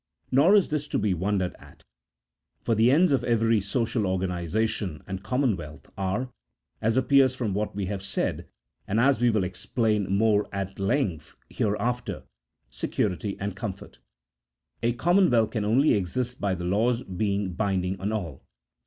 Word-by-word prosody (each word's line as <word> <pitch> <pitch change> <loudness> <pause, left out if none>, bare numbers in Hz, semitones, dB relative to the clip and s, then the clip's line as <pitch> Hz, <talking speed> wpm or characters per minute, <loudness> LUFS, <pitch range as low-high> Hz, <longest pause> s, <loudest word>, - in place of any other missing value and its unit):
Nor 150 +10 +5
is 200 - +4
this 150 -1 -2
to - - -1
be 105 -2 +1
wondered 95 +1 -1
at; - - -17 0.8
for 115 - +1
the 110 +2 +4
ends 165 +6 +4
of 135 - +2
every 115 -2 +2
social 110 +1 -1
or 95 0 +1
ganization 90 0 -2
and 95 0 -5
commonwealth 95 - -2
are 100 +7 -2 0.5
(as 110 +3 +1
appears 130 0 +4
from 115 -6 -2
what 105 0 -2
we 100 -1 -2
have 95 0 -4
said, 100 - -2 0.4
and 105 +3 +1
as 130 0 +3
we 120 - +4
will 110 -4 +1
explain 105 +2 -1
more 105 +1 +2
at 100 -1 -5
length 100 - -1 0.2
here 105 -1 0
after) 120 +3 -2 0.5
security 95 - -2
and 100 -1 -3
comfort; 100 -1 -7 0.8
a 120 +1 +1
commonwealth 160 - +3
can 110 -3 -2
only 130 +8 +4
exist 120 +6 -2
by 100 -2 +1
the 90 0 -5
laws 115 +7 +1
being 100 0 -2
binding 95 -1 -1
on 100 +2 -1
all. 85 -11 -4
105 Hz, 160 wpm, -26 LUFS, 95-120 Hz, 0.8 s, Nor